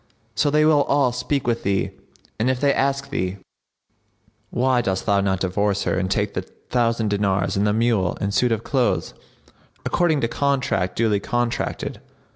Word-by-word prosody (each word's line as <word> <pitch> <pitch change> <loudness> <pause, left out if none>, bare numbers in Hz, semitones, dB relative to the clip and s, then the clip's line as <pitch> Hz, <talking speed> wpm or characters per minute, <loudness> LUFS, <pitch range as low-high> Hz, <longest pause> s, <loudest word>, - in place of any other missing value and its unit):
So 150 - +2
they 150 +1 +3
will 155 -2 +5
all 140 -3 +2
speak 125 +3 -2
with 120 -1 0
thee, 100 -1 0 0.5
and 115 +4 +2
if 130 -1 0
they 140 0 +3
ask 140 0 -1
thee, 95 -6 -2 1.1
'Why 125 0 +2
dost 95 -4 -2
thou 100 -2 +3
not 95 -1 0
divorce 100 +2 0
her - - 0
and 95 0 -1
take 105 0 0
the - - -2
thousand 115 -3 -1
dinars 100 -2 0
and 100 +1 +2
the - - +3
mule 110 -5 +1
and 100 0 -2
suit 125 +3 +2
of 110 0 -1
clothes, 130 -4 0 0.7
according 160 -5 +2
to 115 - +1
contract 120 -8 0
duly 110 -3 +2
contracted?' 120 +3 -2
115 Hz, 170 wpm, -22 LUFS, 100-130 Hz, 1.1 s, will